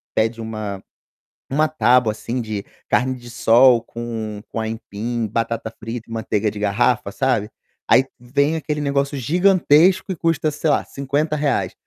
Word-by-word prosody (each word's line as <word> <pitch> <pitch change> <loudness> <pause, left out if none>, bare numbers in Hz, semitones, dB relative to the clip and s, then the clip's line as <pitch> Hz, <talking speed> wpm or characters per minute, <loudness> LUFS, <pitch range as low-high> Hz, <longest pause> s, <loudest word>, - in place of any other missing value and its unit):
pede 115 +1 +1
uma 110 -3 -5 0.7
uma 155 +3 +2
tábua, 125 -4 +3
assim, 120 +3 -4
de 110 -3 -5 0.2
carne-de-sol 120 -1 +3
com 115 -3 -6
com - - -4
aipim, 110 +1 -3
batata 115 +1 -2
frita 115 +1 -6
e - - -12
manteiga 110 -1 -1
de 105 - -8
garrafa, 105 +1 +1
sabe, 115 -4 0 0.4
aí 130 - +6
vem 140 +5 0
aquele 150 -1 -3
negócio 140 0 0
gigantesco 180 - +3
e - - -2
custa, 165 -2 0
sei 150 +1 -1
lá, - - +2
R$50, 145 +1 -1
120 Hz, 135 wpm, -21 LUFS, 110-145 Hz, 0.7 s, aí